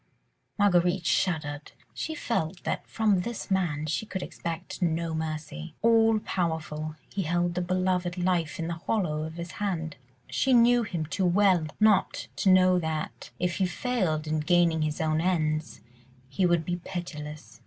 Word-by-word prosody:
Marguerite 180 Hz, -3 st, +3 dB
shuddered. 150 Hz, -4 st, 0 dB, 0.2 s
She 320 Hz, -, -4 dB
felt 180 Hz, -, -2 dB
that -, -, -3 dB
from 210 Hz, -5 st, +2 dB
this 235 Hz, 0 st, -5 dB
man 170 Hz, -6 st, 0 dB
she 160 Hz, +8 st, -2 dB
could 190 Hz, -3 st, -4 dB
expect 170 Hz, +3 st, -6 dB
no 165 Hz, -1 st, 0 dB
mercy. 155 Hz, -, -5 dB
All 225 Hz, -1 st, +5 dB
powerful, 155 Hz, -4 st, -2 dB, 0.2 s
he 200 Hz, -, -1 dB
held 175 Hz, 0 st, 0 dB
the 180 Hz, -, -1 dB
beloved 180 Hz, 0 st, 0 dB
life 175 Hz, -3 st, 0 dB
in 165 Hz, -, -3 dB
the 170 Hz, -, -2 dB
hollow 165 Hz, -9 st, 0 dB
of 160 Hz, +1 st, -5 dB
his 170 Hz, -1 st, -6 dB
hand. 165 Hz, -8 st, -3 dB, 0.3 s
She 140 Hz, -, +1 dB
knew 240 Hz, 0 st, +6 dB
him 175 Hz, -8 st, -3 dB
too 180 Hz, +4 st, 0 dB
well 180 Hz, -3 st, +3 dB
not 215 Hz, -3 st, +3 dB
to 195 Hz, -, +2 dB
know 185 Hz, -1 st, +6 dB
that, 160 Hz, -2 st, -4 dB
if 180 Hz, -1 st, -1 dB
he 190 Hz, -, +2 dB
failed 180 Hz, -8 st, -1 dB
in 155 Hz, 0 st, 0 dB
gaining 170 Hz, 0 st, +3 dB
his 155 Hz, -1 st, -1 dB
own 155 Hz, 0 st, +1 dB
ends, 155 Hz, -3 st, 0 dB, 0.5 s
he 180 Hz, +8 st, +1 dB
would 170 Hz, -2 st, +2 dB
be 175 Hz, +1 st, -1 dB
pitiless. 150 Hz, -, -7 dB
175 Hz, 160 wpm, -28 LUFS, 155-190 Hz, 0.5 s, knew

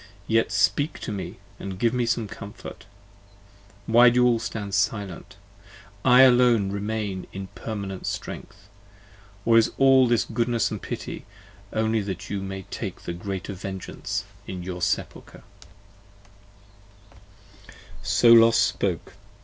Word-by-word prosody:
yet 115 Hz, +2 st, +1 dB
speak 145 Hz, +2 st, +1 dB
to -, -, -6 dB
me 100 Hz, -2 st, -6 dB, 0.2 s
and 95 Hz, -1 st, -6 dB
give 115 Hz, +3 st, +1 dB
Me 125 Hz, -1 st, 0 dB
some 115 Hz, -2 st, 0 dB
comfort! 100 Hz, 0 st, -10 dB, 1.0 s
why 120 Hz, +3 st, +7 dB
do 120 Hz, -, -2 dB
you -, -, +5 dB
all 120 Hz, -2 st, +3 dB
stand 105 Hz, -3 st, -5 dB
silent? 100 Hz, -2 st, -2 dB, 0.7 s
I 125 Hz, 0 st, +7 dB
alone 120 Hz, -6 st, +4 dB
Remain 100 Hz, -2 st, -3 dB
in 95 Hz, -1 st, -7 dB
permanent 100 Hz, -1 st, -6 dB
strength. 100 Hz, 0 st, -6 dB, 0.8 s
Or 115 Hz, 0 st, +6 dB
is 115 Hz, -, +2 dB
all 135 Hz, -1 st, +6 dB
this 120 Hz, -2 st, +2 dB
goodness 115 Hz, 0 st, 0 dB
& -, -, -26 dB
pity, -, -, -6 dB, 0.4 s
only 110 Hz, 0 st, +1 dB
That 95 Hz, -2 st, -6 dB
you 100 Hz, -1 st, -2 dB
may 95 Hz, 0 st, -6 dB
take -, -, -6 dB
the 85 Hz, -, -5 dB
greater 95 Hz, +2 st, -5 dB
vengeance 95 Hz, 0 st, -5 dB, 0.2 s
in 90 Hz, -2 st, -6 dB
your 90 Hz, 0 st, -6 dB
Sepulcher? 85 Hz, -, -3 dB, 2.3 s
80 -, -, -15 dB, 0.3 s
So 115 Hz, -1 st, +5 dB
Los 115 Hz, 0 st, +7 dB
spoke. -, -, 0 dB
105 Hz, 135 wpm, -25 LUFS, 95-115 Hz, 2.3 s, why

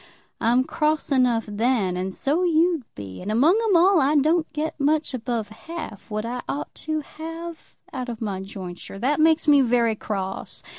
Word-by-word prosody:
I'm 240 Hz, +3 st, +3 dB
cross 305 Hz, +3 st, 0 dB
enough 250 Hz, -4 st, +3 dB
then, 210 Hz, -3 st, +1 dB
and 185 Hz, +1 st, -2 dB
so 285 Hz, -, 0 dB
you'd 335 Hz, -4 st, +2 dB
be. 95 Hz, -2 st, -8 dB
And, 200 Hz, -, -3 dB
among 310 Hz, -, +4 dB
'em 425 Hz, -5 st, +3 dB
all, 360 Hz, 0 st, +5 dB
I 280 Hz, +3 st, +3 dB
don't 315 Hz, +3 st, +2 dB
get 305 Hz, +1 st, -3 dB
much 300 Hz, +1 st, +1 dB
above 235 Hz, -3 st, -3 dB
half 225 Hz, -, -8 dB
what 215 Hz, 0 st, -3 dB
I 245 Hz, +1 st, -3 dB
ought 295 Hz, +2 st, -4 dB, 0.2 s
to 310 Hz, 0 st, 0 dB
have 330 Hz, +2 st, -8 dB, 0.2 s
out 255 Hz, -2 st, -4 dB
of 230 Hz, -2 st, -5 dB
my 200 Hz, -4 st, -3 dB
jointure. 190 Hz, -1 st, -8 dB
That 270 Hz, +8 st, 0 dB
makes 320 Hz, 0 st, +4 dB
me 290 Hz, -2 st, +7 dB
very 235 Hz, -2 st, +3 dB
cross. 195 Hz, -3 st, -5 dB
255 Hz, 180 wpm, -24 LUFS, 215-310 Hz, 0.2 s, me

